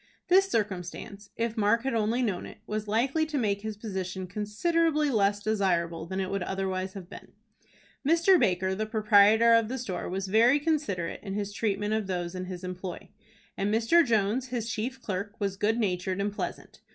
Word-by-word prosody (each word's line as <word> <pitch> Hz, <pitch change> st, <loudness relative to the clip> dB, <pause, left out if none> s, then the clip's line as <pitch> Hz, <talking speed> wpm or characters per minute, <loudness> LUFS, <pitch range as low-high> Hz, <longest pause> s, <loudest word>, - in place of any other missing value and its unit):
This 385 Hz, +2 st, +5 dB
circumstance, 200 Hz, -, -3 dB
if 230 Hz, -1 st, -2 dB
Mark 220 Hz, +1 st, +2 dB
had 270 Hz, -, -1 dB
only 230 Hz, +3 st, +1 dB
known 195 Hz, -6 st, -2 dB
it, -, -, -12 dB
was 215 Hz, 0 st, -4 dB
likely 255 Hz, +9 st, +1 dB
to 305 Hz, -2 st, -3 dB
make 205 Hz, -5 st, 0 dB
his 215 Hz, -1 st, -5 dB
position 190 Hz, -3 st, -4 dB
considerably 300 Hz, -, 0 dB
less 205 Hz, -3 st, +2 dB
desirable 170 Hz, -6 st, 0 dB
than 190 Hz, +2 st, -3 dB
it 190 Hz, -1 st, -2 dB
would 195 Hz, -1 st, -1 dB
otherwise 190 Hz, 0 st, -2 dB
have 190 Hz, -3 st, -8 dB
been. -, -, -12 dB, 0.7 s
Mr. 335 Hz, +5 st, +4 dB
Baker, 190 Hz, +1 st, +1 dB
the 215 Hz, +3 st, -2 dB
proprietor 215 Hz, +1 st, +5 dB
of 230 Hz, -1 st, +4 dB
the 260 Hz, +3 st, -3 dB
store, 225 Hz, -8 st, -4 dB
was 190 Hz, +1 st, -3 dB
very 230 Hz, +8 st, +5 dB
considerate 285 Hz, -, -1 dB
in 195 Hz, -2 st, -5 dB
his 205 Hz, -1 st, -3 dB
treatment 210 Hz, -1 st, -1 dB
of 220 Hz, -2 st, -1 dB
those 175 Hz, -2 st, -3 dB
in 185 Hz, 0 st, -4 dB
his 180 Hz, 0 st, -7 dB
employ, 180 Hz, 0 st, -6 dB, 0.5 s
and 200 Hz, +1 st, -1 dB
Mr. 230 Hz, +10 st, +4 dB
Jones, 230 Hz, 0 st, +1 dB
his 240 Hz, -3 st, -3 dB
chief 240 Hz, +4 st, -3 dB
clerk, 205 Hz, -1 st, -5 dB
was 200 Hz, -2 st, -1 dB
good 210 Hz, +3 st, +1 dB
natured 185 Hz, -3 st, -1 dB
and 200 Hz, +1 st, -1 dB
pleasant. -, -, -6 dB
210 Hz, 185 wpm, -28 LUFS, 190-230 Hz, 0.7 s, This